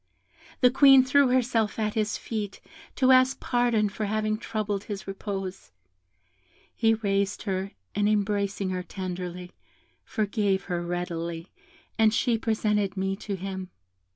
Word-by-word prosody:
The 250 -1 +6
Queen 270 -1 +7
threw 280 +1 +4
herself 245 -4 +1
at 215 -1 -1
his 215 -1 0
feet, 210 -3 -5 0.4
to 260 -1 +4
ask 255 +1 +5
pardon 240 -3 +1
for 210 +1 -4
having 215 +1 0
troubled 210 -2 -3
his 200 -2 -6
repose. 195 - -5 1.0
He 225 -1 +3
raised 200 -2 -1
her, 195 -1 -3 0.2
and 205 0 +1
embracing 200 -2 0
her 185 0 -2
tenderly, 180 -1 -6 0.5
forgave 205 -3 0
her 175 -2 -3
readily, 170 -1 -4 0.5
and 220 -1 +5
she 235 +2 +2
presented 210 -3 0
me 195 0 0
to 200 0 -4
him. 190 0 -6
205 Hz, 130 wpm, -27 LUFS, 190-225 Hz, 1.0 s, Queen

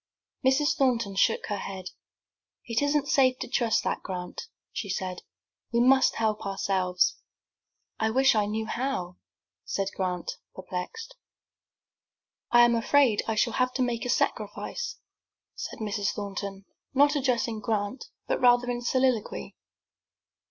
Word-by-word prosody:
Mrs. 265 +3 +3
Thornton 230 -7 +1
shook 190 - +2
her 205 -1 -3
head. 190 -2 -6 0.7
"It 230 +1 0
isn't 285 0 +1
safe 255 -2 +4
to - - -5
trust 235 -3 +1
to - - 0
that, - - -3
Grant," 180 -2 -5 0.3
she 200 - -4
said; 185 -1 -3 0.5
"we 235 - +2
must 265 +2 +5
help 215 -1 0
ourselves." 190 -2 +1 0.8
"I 220 - +2
wish 265 +4 +4
I 210 -2 +2
knew 220 +1 -2
how," 225 -7 -3 0.5
said 195 0 -2
Grant, 180 -2 -2 0.2
perplexed. 185 - -6 1.4
"I 240 - +6
am 240 - +3
afraid 235 -1 +3
I 225 - 0
shall 235 +1 +2
have 255 +2 +1
to 260 - +2
make 240 -2 -1
a 245 - -3
sacrifice," 475 - -1 0.6
said - - -6
Mrs. 205 -2 -1
Thornton, 200 -1 -5 0.3
not 290 +2 +5
addressing 245 -5 0
Grant, 215 +3 -2 0.2
but - - -1
rather 245 0 +5
in 240 0 -3
soliloquy. 255 -2 0
230 Hz, 140 wpm, -27 LUFS, 200-255 Hz, 1.4 s, I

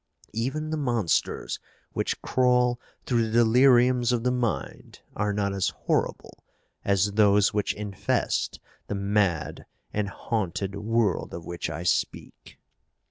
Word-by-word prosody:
Even 135 +8 -2
the 155 - -1
monsters 120 - 0 0.3
which - - -2
crawl 125 -1 +2 0.3
through 115 -3 +1
the 120 +2 +4
deliriums 125 0 +5
of 120 -2 0
the 125 - +2
mind 115 - -3
are 105 0 0
not 100 -1 -1
as 95 -2 +1 0.2
horrible - - -1 0.4
as 100 0 +2
those 105 -1 +4
which 105 -1 0
infest 105 -2 -1 0.3
the 105 - -3
mad 100 -4 0 0.3
and 105 -1 -1
haunted 100 -3 -3
world 110 -1 0
of 85 - -8
which 85 -1 -4
I 80 +2 -5
speak." 90 - -2
105 Hz, 130 wpm, -26 LUFS, 100-120 Hz, 0.4 s, deliriums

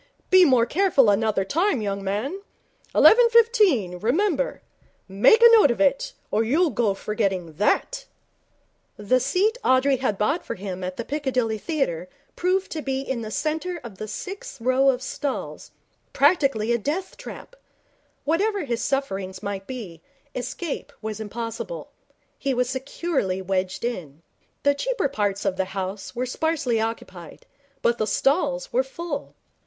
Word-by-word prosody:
Be 370 -1 +8
more 255 -6 +4
careful 295 - +3
another 205 -1 +1
time, 335 - +1
young 200 -2 -3
man. 215 - -2 0.5
Eleven 470 +1 +7
fifteen, 415 - +3
remember. 280 - 0 0.4
Make 205 - +5
a 470 - +11
note 440 -10 +7
of 235 - -1
it, 280 -2 +2 0.2
or 215 +2 +2
you'll 305 +8 +2
go 215 -3 +1
forgetting 195 -6 -2
that.' 355 - +1 0.9
The 210 +5 +2
seat 380 - +1
Audrey 260 +1 +3
had 245 -6 -1
bought 280 - 0
for - - -5
him 185 -1 -6
at 185 0 -4
the 235 - -4
Piccadilly 255 -6 -1
Theatre 185 - -2 0.3
proved 370 +2 0
to 315 - -3
be 270 -1 -2
in 265 -3 -3
the 215 - -5
centre 320 +8 -2
of 220 -6 -10
the 215 - -5
sixth 395 - -7
row 255 +3 +3
of 255 -1 0
stalls 275 0 -4 0.4
practically 275 -7 +3
a 235 - +2
death 330 - -3
trap. - - -10 0.7
Whatever 395 +6 +1
his 235 -3 -2
sufferings 195 -9 -2
might 200 -1 -4
be, 200 -11 -7 0.3
escape 285 +5 -5
was 215 -1 -4
impossible. 230 - -6 0.5
He 275 -2 -1
was 250 0 +1
securely 260 - -2
wedged 190 +2 -2
in. 165 - -5 0.4
The 285 - +4
cheaper - - -1
parts 205 -6 -1
of 190 -1 0
the 190 - +1
house 195 +4 -4
were 250 +1 -1
sparsely 255 -4 0
occupied, 190 -7 -6 0.4
but 235 0 +2
the 215 - 0
stalls 475 - 0
were - - +4
full. 340 - -6
255 Hz, 150 wpm, -24 LUFS, 205-325 Hz, 0.9 s, a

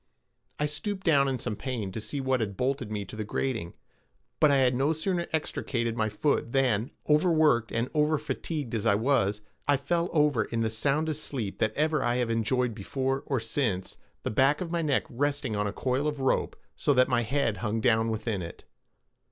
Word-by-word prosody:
I 150 - 0
stooped 190 +6 -3
down 140 -5 +4
in 135 -1 0
some 105 -3 -3
pain, 115 -6 -4
to 110 - -5
see 140 +6 -4
what 130 -1 +1
had 100 -4 -3
bolted 130 -3 -1
me 105 -2 -3
to 95 - -10
the 110 - -3
grating; 110 -4 -3 0.6
but 155 - +6
I 140 - +5
had 130 -2 +4
no 135 +5 +2
sooner 170 +2 -1
extricated 120 -6 -1
my 110 -2 0
foot 115 +2 0
than, 125 -3 +2 0.2
overworked 150 -7 +3
and 115 +2 0
overfatigued 150 -2 -1
as 110 -3 0
I 100 - +5
was, 110 -3 +1 0.3
I 145 -1 +4
fell 170 +5 0
over 150 -8 +3
in 115 -1 -2
the 110 -1 0
soundest 150 +6 0
sleep 115 -8 -4
that 110 0 +1
ever 155 -1 +1
I 120 0 +1
have 120 -2 0
enjoyed 115 +2 +1
before 135 +6 -2
or 135 -3 +1
since, 115 -5 -2 0.2
the - - -2
back 135 +6 +3
of 175 -2 -4
my 170 -1 0
neck 145 -4 +1
resting 140 -2 -1
on 105 0 0
a - - -2
coil 130 +6 -1
of 150 -1 -2
rope, 135 -1 +1 0.2
so 145 - +1
that 130 0 +5
my 125 -2 +2
head 120 -2 0
hung 110 +2 -1
down 115 -1 +3
within 110 -2 -2
it. 85 0 -8
130 Hz, 200 wpm, -28 LUFS, 110-145 Hz, 0.6 s, but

